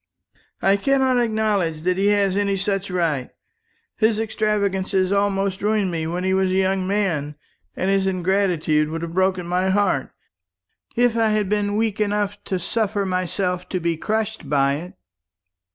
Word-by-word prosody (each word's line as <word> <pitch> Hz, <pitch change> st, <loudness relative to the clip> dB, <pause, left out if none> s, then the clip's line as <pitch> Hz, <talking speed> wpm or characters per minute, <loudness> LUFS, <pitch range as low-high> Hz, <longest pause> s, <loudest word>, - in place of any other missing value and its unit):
"I 195 Hz, +1 st, +4 dB
cannot 265 Hz, +2 st, +2 dB
acknowledge 215 Hz, -8 st, 0 dB
that 180 Hz, +2 st, +1 dB
he 200 Hz, -, +2 dB
has 200 Hz, -2 st, +2 dB
any 200 Hz, -1 st, +1 dB
such 195 Hz, 0 st, -1 dB
right. 165 Hz, -8 st, -1 dB, 0.7 s
His 220 Hz, 0 st, +2 dB
extravagance 205 Hz, -3 st, -1 dB, 0.2 s
almost 200 Hz, -1 st, 0 dB
ruined 210 Hz, -2 st, +1 dB
me 160 Hz, -1 st, -2 dB
when 175 Hz, +2 st, -3 dB
he 190 Hz, 0 st, +1 dB
was 190 Hz, 0 st, +2 dB
a 185 Hz, -, 0 dB
young 190 Hz, 0 st, +1 dB
man; 170 Hz, -8 st, -1 dB, 0.4 s
and 185 Hz, -, -2 dB
his 195 Hz, 0 st, +2 dB
ingratitude 180 Hz, -5 st, +1 dB
would 165 Hz, +1 st, -4 dB
have 165 Hz, 0 st, -5 dB
broken 185 Hz, -1 st, +1 dB
my 180 Hz, +2 st, 0 dB
heart, 205 Hz, +1 st, +1 dB, 0.9 s
if 245 Hz, -1 st, +3 dB
I 225 Hz, -1 st, +2 dB
had 210 Hz, -2 st, 0 dB
been 205 Hz, 0 st, 0 dB
weak 220 Hz, -1 st, 0 dB
enough 205 Hz, 0 st, -1 dB
to 190 Hz, -, -1 dB
suffer 205 Hz, +2 st, -1 dB
myself 180 Hz, 0 st, -2 dB
to 185 Hz, -, -1 dB
be 170 Hz, -1 st, 0 dB
crushed 220 Hz, +5 st, -3 dB
by 140 Hz, -1 st, +3 dB
it." 175 Hz, +4 st, -9 dB
195 Hz, 160 wpm, -22 LUFS, 180-210 Hz, 0.9 s, I